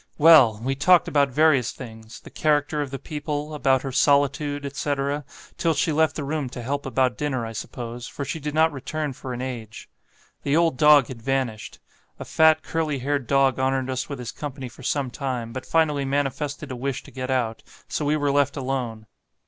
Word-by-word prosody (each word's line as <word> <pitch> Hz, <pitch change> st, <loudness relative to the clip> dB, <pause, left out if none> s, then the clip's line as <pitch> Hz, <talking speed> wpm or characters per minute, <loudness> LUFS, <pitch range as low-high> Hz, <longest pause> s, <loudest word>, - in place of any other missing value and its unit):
Well! 145 Hz, -9 st, +7 dB
we 135 Hz, +2 st, 0 dB
talked 175 Hz, +5 st, +4 dB
about 140 Hz, -2 st, +2 dB
various 135 Hz, -3 st, +3 dB
things; 110 Hz, -3 st, -11 dB
the -, -, -13 dB
character 150 Hz, -1 st, +1 dB
of 145 Hz, -, -3 dB
the 135 Hz, -, -5 dB
people, 150 Hz, +1 st, -4 dB
about 135 Hz, -3 st, +2 dB
her 135 Hz, -, -4 dB
solitude, 145 Hz, +1 st, +2 dB
etc., 140 Hz, +1 st, -2 dB, 0.4 s
till 165 Hz, -2 st, +2 dB
she 150 Hz, +3 st, +1 dB
left 160 Hz, +1 st, +2 dB
the 150 Hz, -, -3 dB
room 145 Hz, -1 st, -2 dB
to 120 Hz, -1 st, -7 dB
help 140 Hz, +3 st, -3 dB
about 130 Hz, -1 st, +1 dB
dinner, 130 Hz, -5 st, -1 dB
I 115 Hz, -, -6 dB
suppose, 120 Hz, +2 st, -6 dB
for 140 Hz, -, -6 dB
she 160 Hz, -, -4 dB
did 150 Hz, 0 st, -4 dB
not 160 Hz, +1 st, +4 dB
return 150 Hz, +1 st, -4 dB
for 130 Hz, +1 st, -8 dB
an 125 Hz, +1 st, -4 dB
age. 115 Hz, -4 st, -7 dB, 0.5 s
The 145 Hz, +2 st, +1 dB
old 165 Hz, -4 st, +3 dB
dog 150 Hz, -1 st, +7 dB
had 120 Hz, -3 st, -8 dB
vanished; 130 Hz, -4 st, -2 dB, 0.4 s
a -, -, -7 dB
fat 160 Hz, 0 st, +4 dB
curly 155 Hz, -3 st, -1 dB
haired 135 Hz, -1 st, -2 dB
dog 135 Hz, -2 st, +3 dB
honoured 130 Hz, 0 st, 0 dB
us 130 Hz, +2 st, -3 dB
with 140 Hz, -, -4 dB
his 125 Hz, -2 st, -6 dB
company 135 Hz, -3 st, -6 dB
for -, -, -15 dB
some 140 Hz, -4 st, -1 dB
time, 125 Hz, -4 st, -4 dB
but 130 Hz, 0 st, -6 dB
finally 150 Hz, -3 st, +2 dB
manifested 140 Hz, +1 st, -2 dB
a -, -, -4 dB
wish 135 Hz, +1 st, -3 dB
to -, -, -14 dB
get 130 Hz, -1 st, -5 dB
out, 120 Hz, -4 st, -1 dB, 0.3 s
so -, -, -2 dB
we 150 Hz, +1 st, +1 dB
were 145 Hz, -1 st, +1 dB
left 140 Hz, 0 st, +1 dB
alone. 125 Hz, -5 st, -3 dB
140 Hz, 200 wpm, -24 LUFS, 130-150 Hz, 0.5 s, Well